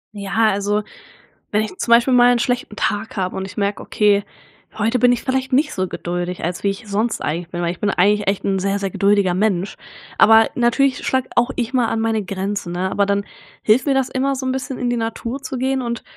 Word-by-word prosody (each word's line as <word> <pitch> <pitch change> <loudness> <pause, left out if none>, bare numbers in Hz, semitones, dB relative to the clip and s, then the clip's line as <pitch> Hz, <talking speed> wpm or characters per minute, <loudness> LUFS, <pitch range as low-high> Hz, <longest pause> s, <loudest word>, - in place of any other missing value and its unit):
Ja, 205 +2 +1
also 205 +1 0 0.7
wenn 210 +1 +2
ich 215 - -6
zum 235 - -2
Beispiel 240 +2 +5
mal 245 0 +6
'n 240 - +2
schlechten 245 -3 -2
Tag 210 +1 -2
habe 185 -1 -2
und 190 - -3
ich 190 - -11
merk: 200 0 -1
Okay, 205 -1 +2 0.5
heute 225 +4 +1
bin 245 0 +4
ich 245 - 0
vielleicht 265 0 -1
nicht 295 +4 +2
so 185 -1 -1
geduldig, 175 +1 -4
als 180 +3 -4
wie 200 - +2
ich 200 +3 -6
sonst 215 +3 -1
eigentlich 165 +3 -3
bin, 175 -1 -4
weil 170 0 0
ich - - -17
bin 210 - +1
eigentlich 205 +2 +2
echt 200 - -2
'n 195 -1 +1
sehr, 195 +1 -1
sehr 195 - -2
geduldiger 200 -1 +2
Mensch 195 -1 0 0.4
aber 225 0 +6
natürlich 255 +2 +1
schlag 260 -1 +1
auch 240 +2 +3
ich 245 +1 -2
mal 245 -3 +2
an 225 - -1
meine 225 -2 0
Grenzen, 195 -1 -4
ne, 180 +2 -2
aber 200 +1 +1
dann 200 0 0 0.4
hilft 225 +6 +3
mir 280 - +2
das 270 -1 +1
immer 270 +1 -1
so 260 0 -5
'n 260 - 0
bisschen 265 0 -4
in 245 - -1
die 240 - 0
Natur 230 +3 -4
zu 265 - -5
gehen 265 +1 0
und, 235 -1 -4
215 Hz, 235 wpm, -20 LUFS, 195-245 Hz, 0.7 s, mal